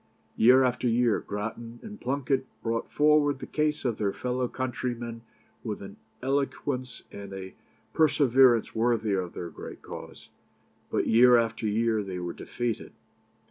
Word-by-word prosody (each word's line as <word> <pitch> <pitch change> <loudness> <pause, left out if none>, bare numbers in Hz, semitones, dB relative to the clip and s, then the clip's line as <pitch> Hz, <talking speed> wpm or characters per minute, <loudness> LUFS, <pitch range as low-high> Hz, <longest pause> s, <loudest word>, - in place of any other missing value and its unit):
Year 130 +3 +6
after 125 0 +1
year 120 -1 +3
Grattan 115 +3 -6
and 210 -1 -9
Plunket 135 0 0 0.2
brought 115 0 -2
forward 150 -1 +4
the - - -7
case 150 -1 -1
of 120 -3 -1
their 100 -2 +1
fellow 125 +2 -2
countrymen 120 -2 -4 0.4
with 105 -3 -4
an 100 0 -9 0.3
eloquence 135 -2 -2
and 100 -1 -8
a 95 -1 -7 0.4
perseverance 130 -6 +4
worthy 110 -2 +1
of 90 -2 -2
their 85 -1 -6
great - - -10
cause; - - -10 0.6
but - - 0
year 120 +2 +7
after 115 -1 0
year 110 +1 +1
they 95 -2 -5
were 90 -1 -4
defeated. 120 -2 -4
120 Hz, 140 wpm, -28 LUFS, 110-130 Hz, 0.6 s, year